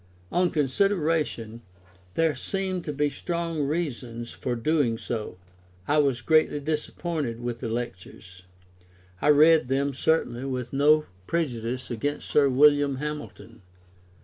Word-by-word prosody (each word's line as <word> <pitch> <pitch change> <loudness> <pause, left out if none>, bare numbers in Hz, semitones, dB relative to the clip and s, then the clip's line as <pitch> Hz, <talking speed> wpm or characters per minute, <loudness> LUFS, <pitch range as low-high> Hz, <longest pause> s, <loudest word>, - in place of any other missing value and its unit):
On 180 0 +2
consideration, 150 - 0 0.5
there 165 -2 +2
seemed 185 +6 -3
to 150 - -2
be 145 +1 +1
strong 170 +1 -3
reasons 130 -6 -3
for 125 - -3
doing 125 -2 +1
so. 110 -5 -5 0.5
I 150 +1 +3
was 135 -4 +1
greatly 155 0 +3
disappointed 150 -3 -3
with 120 -1 -4
the 115 - -4
Lectures. 95 -5 -6 0.8
I - - +1
read 155 -1 +6
them, 140 +2 0
certainly, 130 -4 0
with 125 -2 -4
no 150 +2 +4 0.2
prejudice 125 -6 -2
against 145 +6 -3
Sir 140 -2 +4
William 145 +1 +4
Hamilton. 145 -5 -7
145 Hz, 120 wpm, -26 LUFS, 120-155 Hz, 0.8 s, read